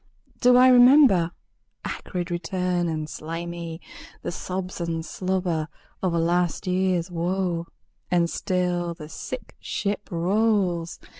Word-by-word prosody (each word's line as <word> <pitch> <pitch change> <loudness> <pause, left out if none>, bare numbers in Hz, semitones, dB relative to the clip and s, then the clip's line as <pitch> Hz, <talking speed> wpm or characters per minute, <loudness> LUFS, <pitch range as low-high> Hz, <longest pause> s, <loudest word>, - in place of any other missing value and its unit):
Do 250 0 +6
I 255 +1 +8
remember? 245 - +7 0.6
Acrid 180 -1 -4
return 180 0 -1
and 155 -2 -2
slimy, 165 +1 -6 0.4
The - - -2
sobs 185 +1 -5
and 165 -1 -2
slobber 180 -2 -1 0.3
of 180 -3 0
a - - +2
last 175 +1 +1
years 185 -1 0
woe. 175 0 -1 0.4
And 175 -1 +3
still 175 -1 -1
the 155 -2 -10
sick - - -7
ship 205 0 -3
rolls. 180 -1 +1
175 Hz, 120 wpm, -25 LUFS, 170-190 Hz, 0.6 s, I